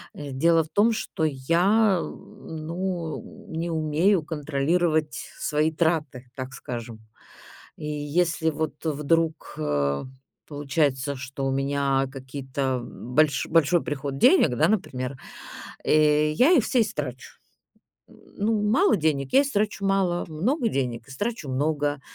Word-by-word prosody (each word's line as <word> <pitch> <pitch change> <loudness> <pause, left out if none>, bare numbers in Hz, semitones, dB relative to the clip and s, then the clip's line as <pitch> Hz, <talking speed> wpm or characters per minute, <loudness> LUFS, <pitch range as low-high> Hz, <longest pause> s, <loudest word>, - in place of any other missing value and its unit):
Э, 145 -1 -7
дело 165 +5 +3
в 155 - -15
том, 220 +3 +4
что 195 -6 -3
я, 175 +8 +3
э, - - -3
ну, 170 +5 -6
э, - - -6
не 170 +1 -2
умею 160 +4 +2
контролировать 155 +1 0
свои 155 +1 +1
траты, 150 -6 -1
так 130 0 -6
скажем. 115 -3 -7 0.8
И 150 - -7
если 160 +2 0
вот 155 -1 -3
вдруг, 160 +1 0
э, 70 -1 0 0.4
получается, 145 -2 0
что 135 +1 -6
у 135 - +1
меня 135 0 +1
какие-то 130 -1 -3
больш 135 +4 0
большой 165 +1 +3
приход 140 -1 -3
денег, 320 - +6
да, - - +4
например, 130 -10 -2 0.7
э, 150 0 +4
я 255 - +4
их 280 -11 +5
все 255 - +2
и - - +6
истрачу. 130 - -5 0.7
Ну, 210 +1 -3
мало 285 - +4
денег- 145 -4 0
я 275 +2 +6
истрачу 210 -6 -1
мало, 190 -3 +1
много 230 - 0
денег- 120 - -2
истрачу 205 - -4
много. 145 +1 0
155 Hz, 130 wpm, -25 LUFS, 135-175 Hz, 0.8 s, денег